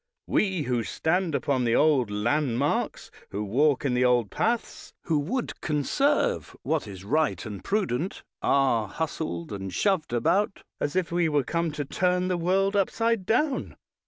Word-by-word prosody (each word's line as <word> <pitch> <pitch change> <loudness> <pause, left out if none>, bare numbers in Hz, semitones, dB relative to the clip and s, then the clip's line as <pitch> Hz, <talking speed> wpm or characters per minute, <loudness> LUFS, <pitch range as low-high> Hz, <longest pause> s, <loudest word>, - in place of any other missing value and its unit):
We, 190 -6 +1
who 125 -3 0
stand 160 - 0
upon 135 -3 0
the 120 -1 +2
old 145 -7 +3
landmarks, 120 +5 0 0.2
who 100 +2 -3
walk 140 +7 +2
in 130 - +1
the 125 0 +2
old 120 -4 +3
paths, 230 +1 -2
who 160 -3 +1
would 235 - -3
conserve 275 - 0
what 155 -7 -1
is 95 -1 -9
wise 150 +4 0
and 105 -3 -7
prudent, 190 - -1 0.2
are 130 -6 +2
hustled 145 - -4
and 95 -1 -5
shoved 190 - +1
about 190 - +1 0.2
as 145 - -2
if 185 -3 0
we 170 -1 +2
were 145 -2 +2
come 170 +4 -1
to 145 -1 -3
turn 180 +4 +1
the 180 - +1
world 190 +4 +1
upside 215 0 +1
down. 265 +4 0
155 Hz, 160 wpm, -26 LUFS, 125-185 Hz, 0.2 s, old